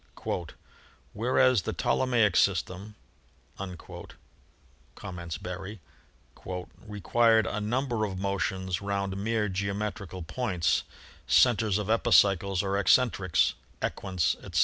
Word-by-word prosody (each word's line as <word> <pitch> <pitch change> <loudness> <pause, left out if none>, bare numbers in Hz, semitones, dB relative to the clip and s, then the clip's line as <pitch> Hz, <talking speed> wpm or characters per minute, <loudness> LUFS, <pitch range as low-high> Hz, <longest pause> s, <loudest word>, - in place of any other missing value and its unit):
"Whereas 125 +1 +3
the - - -4
Ptolemaic 115 -7 +2
system," 100 +2 0 0.6
com 95 -2 -6 1.4
ments 85 -2 -5
Berry, 95 +3 -7 0.6
"required 105 +5 +1
a 105 - -3
number 120 +1 -1
of 95 -2 -5
motions 95 -1 -2
round 100 -1 -2
mere 110 +2 0
geometrical 100 -1 -4
points, 90 -2 0 0.5
centers 110 -5 +4
of 105 0 -2
epicycles 100 -4 +3
or 100 0 0
eccentrics, 100 -5 +3 0.3
equants, 90 -6 0
etc. - - -2
100 Hz, 95 wpm, -28 LUFS, 95-110 Hz, 1.4 s, centers